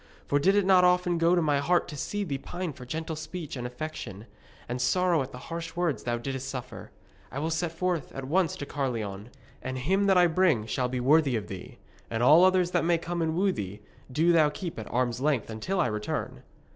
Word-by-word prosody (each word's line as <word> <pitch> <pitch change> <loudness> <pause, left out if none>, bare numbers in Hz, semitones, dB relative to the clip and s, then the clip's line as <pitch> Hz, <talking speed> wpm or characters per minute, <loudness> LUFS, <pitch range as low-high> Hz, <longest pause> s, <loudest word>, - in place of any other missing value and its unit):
For 145 - +2
did 195 +7 +3
it 205 -2 +3
not 185 -1 +6
often 180 -1 +3
go 170 +2 +4
to 175 - +2
my 145 -2 +2
heart 175 +5 +2
to 150 - -7
see 205 +8 -3
thee 140 -8 -3
pine 175 +2 -5
for 125 -1 -11
gentle 160 +3 -4
speech 155 0 -6
and 125 -1 -4
affection, 125 -6 -7 0.4
and 125 +1 -3
sorrow 175 +4 +2
at 130 - -5
the - - -9
harsh 165 0 -5
words 175 -5 0
thou 120 -1 0
didst 135 +2 -4
suffer? 125 -5 -7 0.4
I - - -6
will 160 +3 -1
set 165 +1 -1
forth 170 -3 -2
at 135 - -5
once 165 +3 +1
to 145 - -6
Caerleon, 115 -7 -3 0.3
and 130 0 -4
him 190 +10 +1
that 190 -1 +5
I 180 - +7
bring 165 -9 +2
shall 125 +2 -1
be 125 0 -2
worthy 140 +1 +4
of 110 -2 -2
thee. 95 -2 -8 0.3
And 115 +1 -1
all 155 +7 +7
others 185 -1 +4
that 175 - +1
may 170 0 +3
come 170 +1 -3
and 160 -1 0
woo 195 +2 +2
thee, 105 - -6 0.3
do 160 +6 +3
thou 160 -3 +5
keep 165 - -6
at 110 - -8
arm's 120 0 0
length 140 -6 0
until 185 - -2
I 175 - +3
return.' 105 -2 -3
155 Hz, 225 wpm, -28 LUFS, 125-175 Hz, 0.4 s, I